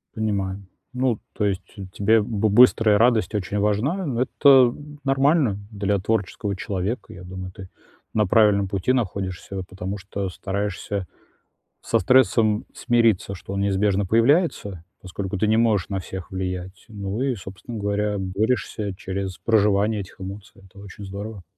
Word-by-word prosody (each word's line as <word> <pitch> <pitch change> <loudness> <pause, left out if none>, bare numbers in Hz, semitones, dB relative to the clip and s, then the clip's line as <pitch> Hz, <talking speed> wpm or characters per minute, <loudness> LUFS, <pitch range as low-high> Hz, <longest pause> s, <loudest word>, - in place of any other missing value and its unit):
Понимаю. 100 -3 -2 0.3
Ну, 125 -3 0
то 105 - -1
есть 95 -1 0 0.3
тебе 110 +2 +3
бы 110 0 0
быстрая 110 -1 +6
радость 115 -1 +3
очень 105 +1 -2
важна, 120 - 0
но 125 -4 -1
это, 140 +2 +3 0.3
м, 145 0 -12
нормально 135 -4 +2
для 100 -1 0
творческого 100 -1 -1
человека. 100 +4 -4
Я 90 0 -11
думаю, 95 0 -7
ты 95 -1 -11 0.4
на 105 -1 +2
правильном 100 -1 +4
пути 100 +5 0
находишься, 95 -5 -3
вот 95 -1 -5
потому 95 +1 -5
что 100 0 -4
стараешься 100 0 -3 0.8
со - - +1
стрессом 110 -1 +3
смириться, 115 -5 +2
что 95 - -8
он 100 - -1
неизбежно 100 0 +1
появляется, 115 - +2 0.2
поскольку 95 +1 -5
ты 105 +2 +1
не 110 +1 +3
можешь 110 -5 +2
на 95 -2 -2
всех 95 0 -7
влиять. 95 0 -5
Ну 100 +2 -4
и, 135 -3 0
собственно 95 +4 -9
говоря, 105 0 -1
борешься 100 +1 -1
через 95 0 -4
проживание 105 -1 +2
этих 95 - -11
эмоций. 95 +1 -9
Это 95 +1 -17
очень 100 0 -10
здорово. 100 0 -7
100 Hz, 150 wpm, -23 LUFS, 95-110 Hz, 0.8 s, быстрая